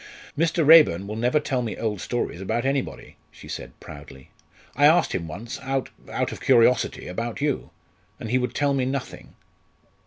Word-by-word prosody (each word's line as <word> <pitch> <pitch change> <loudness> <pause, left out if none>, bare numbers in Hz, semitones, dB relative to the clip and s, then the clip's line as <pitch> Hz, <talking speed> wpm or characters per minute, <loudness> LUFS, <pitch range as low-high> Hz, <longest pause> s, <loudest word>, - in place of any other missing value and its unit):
"Mr. 165 +1 +1
Raeburn 150 - +7
will 105 +2 -6
never 120 +6 +1
tell 135 -3 -2
me 115 -3 -4
old 105 -4 -3
stories 120 -7 -3
about 120 +6 -2
anybody," 135 -1 -3
she - - -14
said - - -8
proudly. 70 -2 -12 0.4
"I 145 +2 +6
asked 160 +3 +3
him 85 -3 -3
once, 105 +9 -7
out 135 0 -2 0.2
out - - -1
of - - -8
curiosity 120 +2 +3
about 115 +6 -4
you, 145 -2 -1 0.5
and 110 - -6
he 130 - +3
would 125 - -3
tell 145 -1 +1
me 135 -2 0
nothing." 135 0 -5
125 Hz, 175 wpm, -24 LUFS, 105-140 Hz, 0.5 s, Raeburn